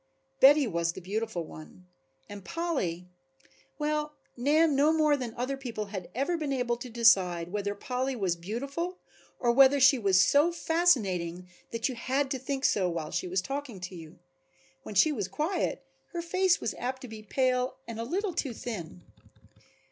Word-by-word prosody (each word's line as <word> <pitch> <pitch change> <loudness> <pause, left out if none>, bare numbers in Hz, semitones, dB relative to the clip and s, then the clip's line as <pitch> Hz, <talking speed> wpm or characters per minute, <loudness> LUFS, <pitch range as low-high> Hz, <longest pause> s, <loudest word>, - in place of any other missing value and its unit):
Betty 285 +1 +7
was 170 -5 -1
the - - -8
beautiful 200 0 -3
one, 155 +3 -12 0.4
and 205 -1 -9
Polly, 185 - -2 0.7
well 300 0 -1 0.2
Nan 295 +4 +3
no 290 +3 +4
more 305 -2 +3
than 245 -5 -5
other 255 +3 -2
people 235 -6 -5
had 185 -3 -5
ever 280 +7 0
been 300 -3 -3
able 245 -3 0
to 245 +1 -8
decide 185 -7 +3
whether 205 0 -2
Polly 255 +5 -2
was 190 -6 0
beautiful 275 - -4 0.4
or 240 - +2
whether 270 +3 +6
she 265 0 +6
was 195 -4 +3
so 285 - +4
fascinating 200 - +1 0.2
that 230 0 -1
you 260 - -3
had 265 +3 -1
to 265 - -1
think 270 +2 -3
so 185 -3 +2
while 165 -3 -4
she - - -2
was 185 +1 -1
talking 275 -6 -5
to 180 +1 -6
you. 165 +1 -11 0.6
When 205 - -9
she 305 +11 +5
was 210 -10 -2
quiet 305 - -2 0.3
her 345 - -2
face 370 +1 +2
was 225 - -2
apt 260 +2 -4
to - - -6
be 220 -2 -9
pale 255 +3 0
and 230 -1 -6
a - - -2
little 370 - -2
too 270 -6 -2
thin. 180 -8 -7
245 Hz, 175 wpm, -29 LUFS, 190-285 Hz, 0.7 s, Betty